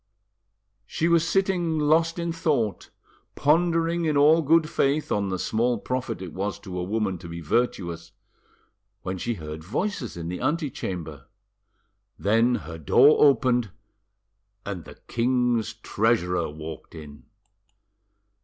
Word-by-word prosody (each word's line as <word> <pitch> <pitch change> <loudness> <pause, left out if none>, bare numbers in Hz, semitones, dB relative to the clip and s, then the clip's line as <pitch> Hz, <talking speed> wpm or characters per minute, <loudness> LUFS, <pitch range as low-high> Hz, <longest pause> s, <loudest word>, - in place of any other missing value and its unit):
She 165 - -1
was 170 -1 +3
sitting 180 -4 +1
lost 160 +3 +2
in 170 0 -2
thought, 140 - -1 0.5
pondering 165 +2 +2
in 155 -2 +1
all 155 +3 +6
good 160 +1 +3
faith 145 +1 0
on 100 -1 0
the 95 - -2
small 115 +5 0
profit 125 -2 -4
it 90 - -8
was 100 +2 -3
to 90 -3 -6
a - - -2
woman 100 -2 -1
to 85 - -10
be 85 0 -6
virtuous, 85 -3 -2 0.9
when 95 0 -4
she 120 +3 -2
heard 80 -2 -8
voices 125 - -3
in 85 -1 -5
the 90 +1 -5
antechamber. 95 - -3 0.9
Then 115 +4 +2
her 80 0 -8
door 130 - +5
opened, 125 -5 +3 1.0
and 95 -4 -5
the - - -12
king's 120 -2 0
treasurer 105 -6 0
walked 80 +2 -9
in. 75 -2 -11
115 Hz, 130 wpm, -25 LUFS, -, 1.0 s, all